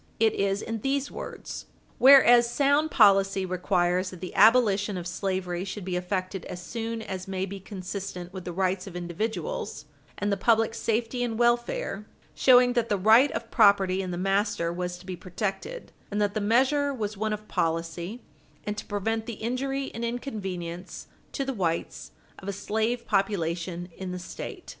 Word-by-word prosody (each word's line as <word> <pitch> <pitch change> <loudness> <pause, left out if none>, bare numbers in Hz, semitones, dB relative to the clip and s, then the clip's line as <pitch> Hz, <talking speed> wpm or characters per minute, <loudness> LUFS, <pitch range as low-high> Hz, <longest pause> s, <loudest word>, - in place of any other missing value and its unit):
It 225 0 +4
is 195 0 0
in 225 -1 -4
these 275 +2 -1
words: - - -7 0.3
"Whereas 245 -3 +8
sound 285 +4 +2
policy 195 -5 +4
requires 180 0 +1
that 185 - -10
the 180 - -7
abolition 210 -3 +4
of 175 - -5
slavery 185 -1 -2
should 195 0 -6
be 185 -1 -2
effected 185 +1 -2
as 180 - -6
soon 225 +3 -4
as 190 -1 -6
may 190 0 -2
be 195 +1 -7
consistent 185 -2 -6
with 190 -2 -6
the 175 - -5
rights 185 +1 -1
of 185 - -9
individuals, 220 - -4 0.3
and 205 0 -1
the 200 - +1
public 225 -1 +3
safety 230 +2 -1
and 230 -2 -2
welfare" 240 -3 0 0.3
showing 250 -1 +5
that 240 -2 0
the 205 - +2
right 220 +8 +6
of 230 - -5
property 195 -3 +4
in 185 - -4
the 175 - -3
master 195 -2 0
was 180 0 -3
to 180 - -15
be 185 -1 -5
protected, 205 - -5 0.2
and 205 - -2
that 205 -1 +1
the 215 - -1
measure 265 +7 +3
was 215 -5 -3
one 215 +2 -2
of 210 0 -5
policy, 165 +6 -2 0.4
and 210 0 -3
to - - -8
prevent 220 +2 -2
the 235 - -4
injury 270 +5 -2
and 230 - -5
inconvenience 190 -8 -5 0.3
to 275 - -2
the 270 - -2
whites 170 -7 -2 0.3
of 195 - -11
a 200 - -2
slave 220 +4 -1
population 175 -4 -1
in 190 -1 -6
the 180 - -4
State. 175 - -8
200 Hz, 175 wpm, -27 LUFS, 185-230 Hz, 0.4 s, Whereas